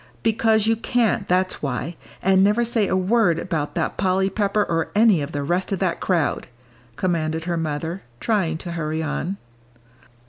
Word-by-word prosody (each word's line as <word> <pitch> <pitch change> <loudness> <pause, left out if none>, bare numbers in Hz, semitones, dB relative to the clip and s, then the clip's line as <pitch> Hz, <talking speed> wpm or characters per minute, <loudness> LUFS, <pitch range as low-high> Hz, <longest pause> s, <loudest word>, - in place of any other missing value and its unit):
"Because 220 -1 +3
you 225 +1 +3
can't, 230 -3 0
that's 185 +1 +1
why. 140 +4 -3 0.3
And 190 0 +4
never 210 +4 +3
say 225 -3 +1
a - - +1
word 190 -2 +2
about 165 -4 -3
that - - -1
Polly 190 0 +1
Pepper 205 +1 +1
or 165 -3 -1
any 210 -6 +5
of 140 +2 -4
the 145 -2 -3
rest 175 +7 -1
of 195 - 0
that 185 -2 -1
crowd," 170 -7 0 0.5
commanded 160 -2 -1
her 175 0 -2
mother, 160 +3 -3 0.2
trying 190 -8 0
to 170 +1 -7
hurry 160 -1 -2
on. 155 +5 -3
185 Hz, 170 wpm, -22 LUFS, 160-205 Hz, 0.5 s, any